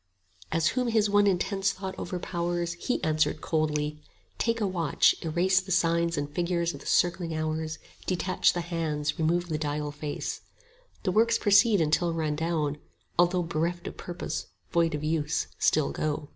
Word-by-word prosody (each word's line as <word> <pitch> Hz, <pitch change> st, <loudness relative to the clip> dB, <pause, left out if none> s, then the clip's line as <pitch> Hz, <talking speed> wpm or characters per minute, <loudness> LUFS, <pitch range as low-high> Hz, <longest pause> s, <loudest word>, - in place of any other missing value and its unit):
30 -, -, 0 dB
As 160 Hz, -1 st, +3 dB
whom 250 Hz, -1 st, 0 dB
his 220 Hz, -3 st, +2 dB
one 205 Hz, 0 st, +5 dB
intense 195 Hz, +1 st, +1 dB
thought 190 Hz, 0 st, -6 dB
overpowers, 175 Hz, -1 st, -2 dB
He 175 Hz, +9 st, -2 dB
answered 155 Hz, -1 st, +1 dB
coldly, 150 Hz, -1 st, -1 dB, 0.4 s
Take 230 Hz, 0 st, +1 dB
a 210 Hz, -, +1 dB
watch, 170 Hz, -6 st, +3 dB
erase 180 Hz, +3 st, +2 dB
The 190 Hz, +1 st, -8 dB
signs 170 Hz, -1 st, +2 dB
and 145 Hz, 0 st, -1 dB
figures 170 Hz, +2 st, -1 dB
of 140 Hz, -, -8 dB
the -, -, -11 dB
circling 175 Hz, -2 st, +1 dB
hours, 155 Hz, 0 st, -2 dB, 0.3 s
Detach 185 Hz, 0 st, +2 dB
the 175 Hz, -, -2 dB
hands, 155 Hz, -3 st, -2 dB
remove 170 Hz, +2 st, +1 dB
the 155 Hz, -1 st, -1 dB
dial 150 Hz, -1 st, -2 dB
face; 145 Hz, 0 st, -4 dB, 0.6 s
The 185 Hz, -, +1 dB
works 230 Hz, +4 st, +4 dB
proceed 205 Hz, 0 st, +5 dB
until 165 Hz, +2 st, +2 dB
run 155 Hz, -2 st, -1 dB
down; 155 Hz, -2 st, -1 dB, 0.4 s
although 175 Hz, 0 st, +4 dB
35 165 Hz, -, -8 dB
Bereft 170 Hz, +2 st, -1 dB
of -, -, -13 dB
purpose, 175 Hz, 0 st, -5 dB, 0.2 s
void 170 Hz, -3 st, +2 dB
of 150 Hz, -, -5 dB
use, 155 Hz, 0 st, 0 dB
still 155 Hz, -2 st, +2 dB
go. 150 Hz, -1 st, -2 dB
170 Hz, 170 wpm, -28 LUFS, 155-185 Hz, 0.6 s, one